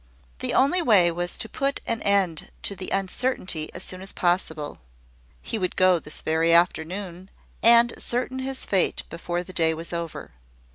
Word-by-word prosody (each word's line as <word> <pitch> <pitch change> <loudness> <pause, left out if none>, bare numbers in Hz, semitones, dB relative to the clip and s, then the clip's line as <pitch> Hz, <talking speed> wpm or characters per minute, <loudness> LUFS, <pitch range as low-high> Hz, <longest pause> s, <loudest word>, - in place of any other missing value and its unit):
The - - -1
only 290 +7 +4
way 200 - +5
was 175 +1 -2
to - - -2
put 275 +5 -2
an 230 -1 -2
end 195 -5 +1
to 200 - 0
the 185 0 -5
uncertainty 190 -5 -2
as - - -7
soon 185 0 -7
as 195 - -6
possible. 160 -4 -1 0.6
He 225 - -3
would 185 -2 -2
go 185 -2 +4
this 150 - -7
very 160 +1 +2
afternoon, 175 +2 +1 0.3
and 235 +1 +6
ascertain 255 +2 -3
his 265 0 -4
fate 190 -3 +1
before 175 +1 -3
the 185 - -11
day 160 -2 +2
was 165 +2 -6
over. 170 -2 -5
185 Hz, 165 wpm, -25 LUFS, 170-225 Hz, 0.6 s, and